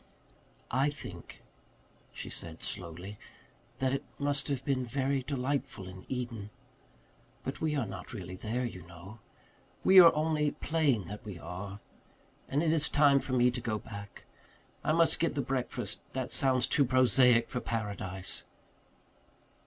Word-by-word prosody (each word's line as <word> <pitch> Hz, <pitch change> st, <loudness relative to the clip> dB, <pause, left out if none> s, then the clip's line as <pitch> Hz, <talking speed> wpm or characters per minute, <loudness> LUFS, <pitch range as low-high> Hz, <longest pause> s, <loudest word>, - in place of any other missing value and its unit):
"I 135 Hz, +3 st, +3 dB
think," 145 Hz, -, -9 dB, 0.7 s
she -, -, -7 dB
said 80 Hz, -1 st, -5 dB
slowly, 90 Hz, +2 st, -5 dB, 0.6 s
"that 130 Hz, 0 st, +1 dB
it 135 Hz, -, -1 dB
must 145 Hz, -1 st, -1 dB
have 135 Hz, -2 st, -2 dB
been 135 Hz, -2 st, +1 dB
very 135 Hz, +2 st, 0 dB
delightful 135 Hz, -5 st, -2 dB
in 95 Hz, 0 st, -11 dB
Eden. 120 Hz, -5 st, -4 dB, 0.9 s
But 135 Hz, -, -5 dB
we 155 Hz, -1 st, +1 dB
are 135 Hz, -5 st, 0 dB
not 95 Hz, -3 st, -8 dB
really 90 Hz, -5 st, -6 dB
there, 115 Hz, +6 st, -2 dB
you 95 Hz, -6 st, -6 dB
know 90 Hz, +7 st, -11 dB, 0.6 s
we 190 Hz, 0 st, +9 dB
are 170 Hz, -2 st, +10 dB
only 155 Hz, -1 st, +1 dB
playing 150 Hz, -9 st, +1 dB
that 105 Hz, +5 st, -7 dB
we 100 Hz, -5 st, -7 dB
are. 95 Hz, +4 st, -7 dB, 0.7 s
And 145 Hz, +4 st, +1 dB
it 160 Hz, -1 st, +3 dB
is 160 Hz, -2 st, +3 dB
time 145 Hz, -2 st, +5 dB
for 130 Hz, -, -4 dB
me 125 Hz, 0 st, +4 dB
to 125 Hz, 0 st, -5 dB
go 110 Hz, -2 st, -1 dB
back. 100 Hz, -1 st, -9 dB, 0.6 s
I -, -, +2 dB
must 165 Hz, +1 st, +4 dB
get 165 Hz, -, +1 dB
the 140 Hz, -, 0 dB
breakfast 125 Hz, -4 st, -2 dB
that 130 Hz, -1 st, -3 dB
sounds 130 Hz, -3 st, +3 dB
too 145 Hz, -, +4 dB
prosaic 125 Hz, -2 st, +5 dB
for 125 Hz, -, -1 dB
paradise." 100 Hz, -5 st, -4 dB
125 Hz, 150 wpm, -31 LUFS, 100-140 Hz, 0.9 s, are